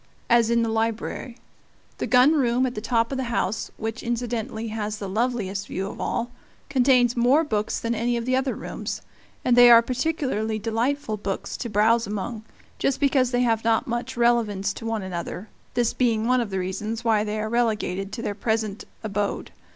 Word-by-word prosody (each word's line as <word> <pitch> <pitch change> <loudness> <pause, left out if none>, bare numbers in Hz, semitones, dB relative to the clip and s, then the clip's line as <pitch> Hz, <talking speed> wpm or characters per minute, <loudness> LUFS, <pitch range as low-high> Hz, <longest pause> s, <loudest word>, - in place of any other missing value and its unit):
as 235 -1 +5
in 235 0 +3
the - - 0
library; 225 +2 -2 0.6
the - - -1
gun 250 +4 +6
room 255 -3 +2
at 250 - -2
the 210 - -5
top 230 +1 +1
of 265 - -2
the 260 - -1
house, 220 -3 -1
which 225 0 -4
incidentally 230 -2 -3
has 215 -1 -3
the 200 - -5
loveliest 205 -2 -1
view 190 - -3
of 200 - -7
all, 240 +1 -2 0.4
contains 250 -2 +4
more 255 +6 +4
books 215 -8 -1
than 230 0 -1
any 235 +1 0
of 230 - -3
the 255 +1 +1
other 260 0 0
rooms; - - -5 0.4
and 245 - +4
they 245 0 +9
are 235 -1 +8
particularly 255 -4 -1
delightful 225 +2 -1
books 200 -1 -4
to 235 - -4
browse 220 +2 +3
among, 210 +2 -4 0.4
just 270 - 0
because 270 -3 +3
they 245 0 +1
have 225 -2 +1
not 225 0 +2
much 240 +2 -4
relevance 220 -5 +2
to 225 - -7
one 225 -3 -2
another, 185 +2 -5 0.3
this 240 -1 +2
being 225 -3 +1
one 250 +1 +3
of 230 - -3
the 190 - -3
reasons 200 +5 -3
why 220 -2 +3
they 215 0 -3
are 215 - -2
relegated 215 -4 -1
to 235 - -5
their 205 - -1
present 220 -1 -2 0.2
abode. 205 -1 -2
230 Hz, 190 wpm, -24 LUFS, 215-245 Hz, 0.6 s, they